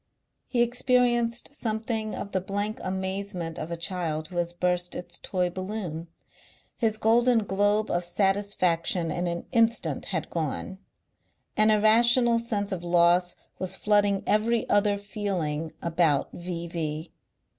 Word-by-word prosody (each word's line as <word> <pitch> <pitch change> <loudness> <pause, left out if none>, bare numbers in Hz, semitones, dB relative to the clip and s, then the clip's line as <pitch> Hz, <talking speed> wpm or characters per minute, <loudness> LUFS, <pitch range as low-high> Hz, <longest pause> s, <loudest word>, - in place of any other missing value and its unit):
He 240 -2 +2
experienced 240 0 +1
something 220 -3 -2
of 200 - -6
the 190 - 0
blank 205 +3 -3
amazement 190 -2 -3
of 155 - -5
a 170 - -4
child 165 -3 -2
who 180 - -7
has 170 0 0
burst 180 0 -1
its 175 -1 -7
toy 180 -2 -1
balloon. 185 -3 -5 0.7
His 220 -2 0
golden 230 +1 +3
globe 205 +2 +1
of 175 - 0
satisfaction 180 -3 +1
in 175 +3 -1
an 170 0 -3
instant 230 -1 +1
had 165 -6 -3
gone. 170 +4 -3 0.8
An 215 0 +4
irrational 230 +3 +5
sense 210 -3 -2
of 180 -3 -3
loss 175 +1 +3 0.2
was 185 -1 0
flooding 205 -2 +2
every 225 +2 +1
other 205 0 +3
feeling 185 -7 -3
about 165 -4 +2
V.V. 170 -2 -5
195 Hz, 130 wpm, -26 LUFS, 175-215 Hz, 0.8 s, irrational